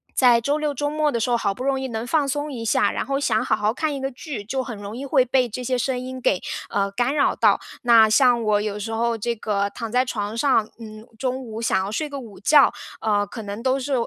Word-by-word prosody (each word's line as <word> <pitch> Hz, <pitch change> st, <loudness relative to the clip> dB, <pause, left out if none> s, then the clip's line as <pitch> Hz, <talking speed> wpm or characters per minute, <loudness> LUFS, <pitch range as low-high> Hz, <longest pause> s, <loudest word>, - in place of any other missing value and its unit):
在 245 Hz, -3 st, +5 dB
周 285 Hz, +5 st, 0 dB
六 300 Hz, -1 st, -1 dB
周 290 Hz, +2 st, -2 dB
末 300 Hz, 0 st, +1 dB
的 235 Hz, -, -1 dB
时 230 Hz, -, -1 dB
候， 240 Hz, -, +3 dB
好 200 Hz, -3 st, 0 dB
不 250 Hz, -, -7 dB
容 275 Hz, -1 st, 0 dB
易 265 Hz, -, -3 dB
能 225 Hz, 0 st, -4 dB
放 300 Hz, -1 st, +1 dB
松 290 Hz, +2 st, -2 dB
一 235 Hz, -4 st, -6 dB
下， 210 Hz, -1 st, +2 dB
然 -, -, -3 dB
后 275 Hz, 0 st, -1 dB
想 260 Hz, -2 st, +1 dB
好 -, -, +2 dB
好 210 Hz, +1 st, 0 dB
看 305 Hz, +5 st, -2 dB
一 270 Hz, -, -5 dB
个 270 Hz, -, -1 dB
剧， 255 Hz, -3 st, -7 dB
就 260 Hz, +5 st, -2 dB
很 245 Hz, -3 st, -6 dB
容 205 Hz, +2 st, -8 dB
易 275 Hz, -, -5 dB
会 265 Hz, -2 st, +3 dB
被 255 Hz, 0 st, +1 dB
这 245 Hz, +3 st, -6 dB
些 255 Hz, +1 st, 0 dB
声 250 Hz, +1 st, -1 dB
音 255 Hz, +1 st, -6 dB
给， 195 Hz, -7 st, +1 dB, 0.3 s
呃， 200 Hz, 0 st, 0 dB
干 245 Hz, +7 st, 0 dB
扰 285 Hz, -, +2 dB
到。 -, -, +3 dB, 0.2 s
那 230 Hz, -2 st, +6 dB
像 245 Hz, +1 st, +4 dB
我 210 Hz, -2 st, +2 dB
有 210 Hz, 0 st, -3 dB
时 225 Hz, +2 st, -5 dB
候 230 Hz, +1 st, 0 dB
这 235 Hz, +2 st, -2 dB
个 200 Hz, -2 st, -1 dB
躺 230 Hz, +2 st, -6 dB
在 250 Hz, +2 st, +3 dB
床 215 Hz, -4 st, -4 dB
上， 230 Hz, -3 st, +2 dB
嗯， 215 Hz, -1 st, -10 dB
中 260 Hz, -1 st, -1 dB
午 220 Hz, 0 st, -6 dB
想 190 Hz, -4 st, +1 dB
要 200 Hz, -, -5 dB
睡 300 Hz, +7 st, -2 dB
个 280 Hz, -, -6 dB
午 225 Hz, -6 st, -11 dB
觉， 285 Hz, +4 st, +5 dB, 0.3 s
呃， 205 Hz, -2 st, +1 dB
可 225 Hz, +2 st, -8 dB
能 205 Hz, +2 st, -6 dB
都 260 Hz, +2 st, +1 dB
是 275 Hz, +2 st, -3 dB
240 Hz, 285 characters per minute, -23 LUFS, 215-270 Hz, 0.3 s, 那